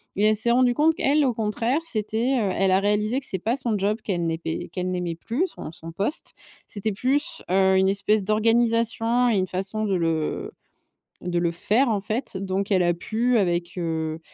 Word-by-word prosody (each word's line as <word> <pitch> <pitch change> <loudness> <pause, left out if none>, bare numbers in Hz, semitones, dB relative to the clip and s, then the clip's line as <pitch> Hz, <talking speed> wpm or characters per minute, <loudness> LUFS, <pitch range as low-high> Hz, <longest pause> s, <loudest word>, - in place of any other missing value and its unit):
et 205 - +2
elle 215 0 +4
s'est 235 +3 +2
rendu 245 0 +3
compte, 315 +4 +3
qu'elle, 295 -4 +2
au 250 - +1
contraire, 225 +6 -1
c'était, 235 -1 -1
heu 200 -3 0
elle 195 0 +1
a 190 - +4
réalisé 210 +4 +1
que 275 - -6
c'est 190 -7 -2
pas 230 +6 0
son 240 -5 -2
job 205 +2 0
qu'elle 175 -4 -1
n'aimait 165 0 -4
qu'elle 185 0 -3
n'aimait 175 -2 -3
plus, 240 - -2
son 155 - -8
son 165 0 -9
poste. 200 - -1 0.3
C'était 210 +1 -3
plus, 265 +8 +1
heu, 190 0 +4
une 190 0 +3
espèce 200 +1 +1
d'organisation 230 +2 +2
et 210 - +2
une 185 - -1
façon 195 +4 -1
de 195 -2 0
le 165 -3 -1 0.7
de 175 -1 -2
le 170 -1 0
faire 225 +9 +1
en 205 -3 0
fait 215 -1 -3
donc 195 +1 -3
elle 185 -2 +4
a 175 0 +2
pu 230 +6 0
avec, 175 -2 -1
heu, 160 -2 -3
210 Hz, 200 wpm, -24 LUFS, 185-235 Hz, 0.7 s, elle